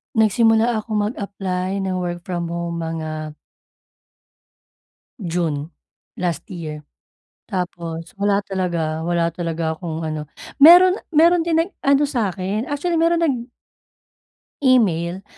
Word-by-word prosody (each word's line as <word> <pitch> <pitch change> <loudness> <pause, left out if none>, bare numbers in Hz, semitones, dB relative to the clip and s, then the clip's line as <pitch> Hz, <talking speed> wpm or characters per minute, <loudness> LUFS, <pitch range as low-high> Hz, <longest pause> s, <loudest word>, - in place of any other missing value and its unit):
Nagsimula 225 +1 +3
akong 215 -1 -1
mag-apply 195 -2 -3
ng 185 -1 -1
work 175 -1 -4
from 175 -2 -3
home 170 0 -4
mga 155 -2 -5 1.9
June, 165 -3 -2 0.5
last 175 -3 -2
year. 155 -4 -6 0.7
Tapos 170 -3 -4
wala 200 0 +2
talaga 170 -5 -2
wala 170 0 +1
talaga 165 -1 -2
akong 160 -1 -5
ano, 155 -1 -3 0.4
meron 360 +4 +9 0.2
meron 335 +3 +5
din 330 -1 +1
nag-ano 295 -5 +1
sa'kin, 205 -4 -2
actually 295 +4 -1
meron 335 +1 +3
nag 260 -8 -1 1.1
email 190 -8 +2
185 Hz, 105 wpm, -21 LUFS, 170-235 Hz, 1.9 s, meron